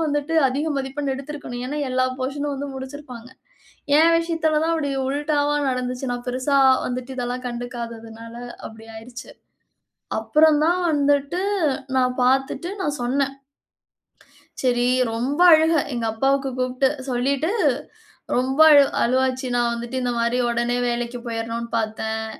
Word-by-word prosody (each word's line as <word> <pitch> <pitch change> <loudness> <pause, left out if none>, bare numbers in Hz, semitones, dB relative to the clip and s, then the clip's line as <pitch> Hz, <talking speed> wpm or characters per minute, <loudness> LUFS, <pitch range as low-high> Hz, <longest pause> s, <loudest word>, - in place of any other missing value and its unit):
வந்துட்டு 295 +1 -1
அதிக 280 +5 -2
மதிப்பெண் 275 +1 -2
எடுத்திருக்கணும். 275 -3 -7
ஏன்னா, 295 +3 -4
எல்லா 255 0 +2
போர்ஷன் 275 +3 -3
நும் 285 - -2
வந்து 285 +1 -4
முடிச்சிருப்பாங்க. 260 -3 -8 0.7
ஏன் 335 +1 +6
விஷயத்தில 325 -2 0
தான் 330 0 +1
அப்டி 285 -3 -1 0.2
உல்டாவா 290 +1 0 0.2
நடந்துச்சி. 255 +1 -3
நான் 245 0 -6
பெருசா 260 +3 +1 0.3
வந்துட்டு 255 +1 -4
இதெல்லாம் 250 0 -3
கண்டுக்காததுனால 230 -1 -7 0.3
அப்டி 220 0 -14
ஆயிருச்சு. 245 +3 -10 0.9
அப்புறம் 310 0 +4
தான் 355 +2 +2
வந்துட்டு 285 +3 +1 0.6
நான் 250 -1 +2
பார்த்துட்டு 270 +5 +1
நான் 295 -5 -2
சொன்னே. 270 +3 +1 1.4
சரி. 245 -1 +2 0.3
ரொம்ப 255 +7 -2
அழுக 320 +1 +4 0.2
எங்க 230 -1 -2
அப்பாவுக்கு 270 +2 +1
கூப்ட்டு 255 +1 +1 0.2
சொல்லீட்டு 275 +7 0 0.9
ரொம்ப 265 +4 -1
அழு 285 -1 +8 0.2
அழுவாச்சி. 260 +1 +1
நான் 240 -1 +2
வந்துட்டு 235 +2 -5
இந்த 245 -1 0
மாரி 235 +1 +1
உடனே 240 +1 0
வேலைக்கு 240 0 -3
போயிறணும்னு 230 0 -4
பார்த்தேன். 220 0 -2
260 Hz, 130 wpm, -22 LUFS, 240-285 Hz, 1.4 s, அழு